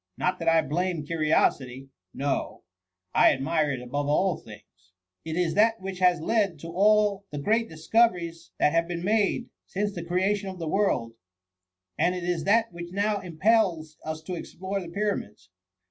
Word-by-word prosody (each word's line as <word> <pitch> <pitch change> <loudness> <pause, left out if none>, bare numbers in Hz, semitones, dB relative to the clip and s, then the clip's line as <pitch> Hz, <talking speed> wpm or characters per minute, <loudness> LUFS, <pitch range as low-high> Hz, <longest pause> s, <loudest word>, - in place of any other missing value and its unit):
Not 180 0 0
that 165 -1 +1
I 165 -1 +4
blame 170 0 -2
curiosity— 140 -4 0 0.2
no— 140 0 -3 0.5
I - - +6
admire 150 +3 0
it 125 -2 -5
above 145 +3 -3
all 175 +4 +2
things 90 -4 -16
!— 90 +5 -56
it 160 - -3
is 175 -2 +1
that 225 +2 +3
which 190 -1 -6
has 180 -1 +4
led 195 0 +1
to 165 - -7
all 205 +2 +3
the 145 - -6
great 225 +10 +1
dis 160 0 -12
coveries 175 -8 +2
that 150 - +3
have 165 0 +2
been 175 -1 -4
made 215 +4 +1 0.2
since 205 +1 -2
the 170 - -5
creation 190 +3 0
of 185 - -8
the 165 -2 -5
world, 155 - 0 0.9
and 180 +1 +2
it 180 - -5
is 175 -3 -1
that 225 0 +3
which 175 0 -8
now 205 +2 0
impels 180 -3 +1
us 155 0 -5
to 180 - -5
explore 190 +3 -5
the 175 - -8
pyramids. 170 - -3
175 Hz, 175 wpm, -26 LUFS, 155-200 Hz, 0.9 s, I